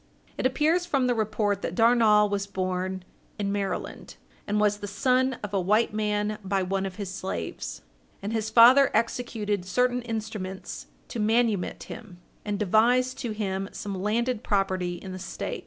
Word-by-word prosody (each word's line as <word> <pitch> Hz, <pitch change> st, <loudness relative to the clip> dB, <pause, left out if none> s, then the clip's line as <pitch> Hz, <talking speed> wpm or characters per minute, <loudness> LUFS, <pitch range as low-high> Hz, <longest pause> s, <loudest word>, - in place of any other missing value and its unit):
It -, -, +2 dB
appears 320 Hz, +6 st, +1 dB
from 275 Hz, -6 st, +1 dB
the 250 Hz, -, +2 dB
report 215 Hz, -3 st, 0 dB
that 170 Hz, -, -3 dB
Darnall 225 Hz, -2 st, +5 dB
was 200 Hz, -1 st, -2 dB
born 185 Hz, -1 st, -2 dB, 0.3 s
in 200 Hz, -1 st, -1 dB
Maryland, 200 Hz, -1 st, -4 dB, 0.3 s
and 210 Hz, +1 st, +1 dB
was 210 Hz, 0 st, +2 dB
the 205 Hz, -, -6 dB
son 255 Hz, +5 st, +1 dB
of 205 Hz, -1 st, -5 dB
a 195 Hz, -, +2 dB
white 210 Hz, +5 st, +2 dB
man 210 Hz, 0 st, -1 dB
by 195 Hz, 0 st, 0 dB
one 195 Hz, +1 st, -1 dB
of 185 Hz, -, -8 dB
his 195 Hz, -2 st, -5 dB
slaves, 185 Hz, -, -5 dB, 0.4 s
and 205 Hz, +3 st, -4 dB
his 220 Hz, -1 st, -1 dB
father 245 Hz, +5 st, +7 dB
executed 220 Hz, -4 st, -1 dB
certain 250 Hz, +6 st, +1 dB
instruments 215 Hz, -5 st, -5 dB, 0.2 s
to 235 Hz, -, -5 dB
manumit 220 Hz, -3 st, +1 dB
him, 220 Hz, -6 st, -10 dB, 0.2 s
and 205 Hz, -1 st, -2 dB
devised 245 Hz, +6 st, +3 dB
to 240 Hz, -, -3 dB
him 195 Hz, -2 st, -3 dB
some 205 Hz, -, -5 dB
landed 230 Hz, +3 st, 0 dB
property 185 Hz, -3 st, 0 dB
in 190 Hz, +2 st, -8 dB
the 185 Hz, -, -6 dB
State. 190 Hz, -, -5 dB
210 Hz, 165 wpm, -26 LUFS, 195-235 Hz, 0.4 s, father